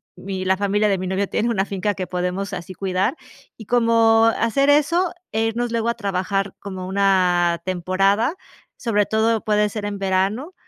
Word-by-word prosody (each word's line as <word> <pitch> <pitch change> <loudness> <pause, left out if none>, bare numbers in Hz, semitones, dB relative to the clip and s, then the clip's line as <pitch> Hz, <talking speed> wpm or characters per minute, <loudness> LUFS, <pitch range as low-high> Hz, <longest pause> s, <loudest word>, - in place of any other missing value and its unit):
mi 190 -1 -5
la 190 0 +2
familia 205 +1 +1
de 195 - +1
mi 185 - -4
novio 190 +2 -1
tiene 235 - -1
una 195 -4 0
finca 200 0 -2
que 185 - -3
podemos 180 +2 -3
así 185 +1 -6
cuidar 190 - -1 0.4
y 220 - -11
como 230 -1 +4
hacer 275 +5 +2
eso 330 +5 +3 0.2
e 220 +1 0
irnos 235 +1 -2
luego 230 0 0
a 235 - -1
trabajar 195 -2 -2
como 190 -2 -7
una 180 -3 +2
temporada, 195 - +1 0.4
sobre 210 -4 +1
todo 220 0 +1
puede 210 -1 +2
ser 210 0 -5
en 205 -1 -3
verano, 195 - -1
200 Hz, 175 wpm, -21 LUFS, 190-225 Hz, 0.4 s, como